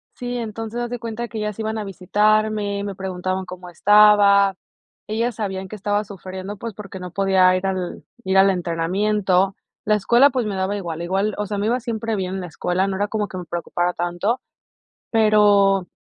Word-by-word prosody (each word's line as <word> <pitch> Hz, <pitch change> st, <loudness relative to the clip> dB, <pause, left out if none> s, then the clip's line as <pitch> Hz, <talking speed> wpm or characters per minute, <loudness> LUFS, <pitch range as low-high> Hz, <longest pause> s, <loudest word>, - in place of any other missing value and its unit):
sí, 245 Hz, 0 st, -4 dB
entonces, 225 Hz, 0 st, -5 dB
haz 240 Hz, -, -3 dB
de 245 Hz, -1 st, -4 dB
cuenta 235 Hz, 0 st, -5 dB
que 225 Hz, -, -8 dB
ellas 210 Hz, -1 st, -3 dB
iban 220 Hz, 0 st, -2 dB
a 215 Hz, -, -3 dB
visitarme, 210 Hz, +1 st, +1 dB
me 200 Hz, -1 st, -5 dB
preguntaban 185 Hz, 0 st, -3 dB
cómo 180 Hz, 0 st, -9 dB
estaba. 200 Hz, +1 st, +5 dB, 0.5 s
Ellas 230 Hz, +2 st, -1 dB
sabían 190 Hz, -3 st, -4 dB
que 215 Hz, -, -7 dB
estaba 205 Hz, +1 st, -1 dB
sufriendo, 190 Hz, 0 st, -8 dB
pues, 230 Hz, +2 st, -6 dB
porque 195 Hz, -2 st, -9 dB
no 180 Hz, -1 st, -7 dB
podía 190 Hz, -1 st, +4 dB
ir 185 Hz, +1 st, -2 dB
al 185 Hz, -2 st, -3 dB, 0.2 s
ir 190 Hz, 0 st, +2 dB
al 195 Hz, +1 st, +6 dB
entrenamiento. 185 Hz, +2 st, +1 dB, 0.3 s
La 215 Hz, -, +3 dB
escuela, 235 Hz, +7 st, +5 dB
pues, 250 Hz, -3 st, -1 dB
me 205 Hz, -2 st, -3 dB
daba 190 Hz, +2 st, -1 dB
igual 170 Hz, -5 st, -5 dB
igual, 195 Hz, +4 st, -1 dB
o 210 Hz, -, -2 dB
sea, 205 Hz, 0 st, -4 dB
me 205 Hz, +1 st, -1 dB
iba 245 Hz, +3 st, +1 dB
siempre 225 Hz, -2 st, -3 dB
bien 185 Hz, -1 st, -3 dB
en 190 Hz, -, -3 dB
la 180 Hz, -, -6 dB
escuela, 175 Hz, +5 st, -1 dB
no 190 Hz, -, -2 dB
era 205 Hz, +1 st, 0 dB
como 210 Hz, 0 st, -2 dB
que 185 Hz, -, -8 dB
me 180 Hz, -, -6 dB
preocupara 175 Hz, +1 st, -2 dB
tanto, 175 Hz, +8 st, -1 dB, 0.7 s
pero, 205 Hz, -3 st, +4 dB
200 Hz, 195 wpm, -21 LUFS, 185-215 Hz, 0.7 s, al